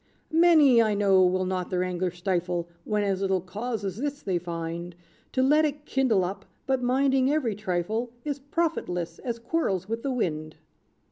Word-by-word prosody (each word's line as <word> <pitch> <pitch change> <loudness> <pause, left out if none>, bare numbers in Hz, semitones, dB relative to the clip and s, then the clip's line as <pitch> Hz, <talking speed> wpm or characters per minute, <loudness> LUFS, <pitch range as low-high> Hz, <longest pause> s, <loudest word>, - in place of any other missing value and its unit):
"Many, 315 -7 +6
I 215 -2 +2
know, 195 -2 +4
will 185 +1 +2
not 185 -1 -2
their 180 -1 0
anger 180 0 -1
stifle, 175 -1 -2 0.2
When 210 -1 0
as 195 -1 0
little 190 -1 +1
cause 205 +4 -4
as 190 0 -3
this, 285 +3 -3
they 185 -3 0
find 170 0 -5 0.4
To 260 - +2
let 300 +4 +4
it 295 -1 -2
kindle 240 -11 +2
up; 195 +2 -6 0.2
but 265 -1 +1
minding 265 +1 +2
every 280 -8 +1
trifle 210 +4 -2 0.2
Is 285 -1 -2
profitless 280 - -2
as 235 -2 -3
quarrels 230 - -1
with 225 +1 -3
the 275 - -2
wind. 155 -11 -2
205 Hz, 175 wpm, -27 LUFS, 180-265 Hz, 0.4 s, Many